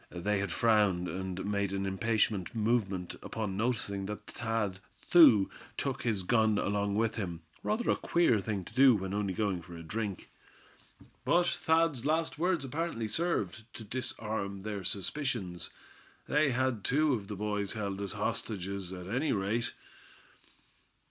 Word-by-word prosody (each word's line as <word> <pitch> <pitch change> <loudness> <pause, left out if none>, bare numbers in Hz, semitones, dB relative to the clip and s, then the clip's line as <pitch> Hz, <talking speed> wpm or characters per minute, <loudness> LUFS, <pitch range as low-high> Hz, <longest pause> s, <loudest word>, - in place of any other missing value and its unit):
They 100 +4 -1
had 100 -2 -2
frowned, 100 -3 +3
and 95 +2 -4
made 100 -1 0
an 100 0 -1
impatient 105 0 0
movement 105 -5 0
upon 105 -4 -3
noticing 100 -3 -1
that 105 0 -6
Thad, 110 -5 -2 0.3
too, 135 - +8 0.3
took - - -2
his 110 -5 -1
gun 110 +1 +3
along 100 0 0
with 110 +1 +1
him, 85 -6 -4 0.2
rather 225 +3 -1
a - - +3
queer 170 -11 +3
thing 100 -2 -3
to - - -11
do 130 0 +7
when 95 -1 -3
only 100 -2 -1
going 100 -4 0
for 85 0 -10
a 85 - -8
drink. 100 +2 -4 0.9
But 175 +1 +3
Thad's 160 -6 +2
last 160 +1 +1
words 175 -4 +1
apparently 140 -4 -2
served 115 - -1
to 115 - -7
disarm 105 -4 -4
their 105 -2 -4
suspicions. 100 - -2 0.6
They 150 0 +3
had 130 -4 0
two 150 +2 +3
of 105 -5 -3
the 105 - -5
boys 105 -1 -1
held 100 -3 -3
as 100 - -2
hostages, 95 -2 -2
at 90 -1 -7
any 135 +8 0
rate. 110 +4 -1
105 Hz, 150 wpm, -31 LUFS, 95-120 Hz, 0.9 s, too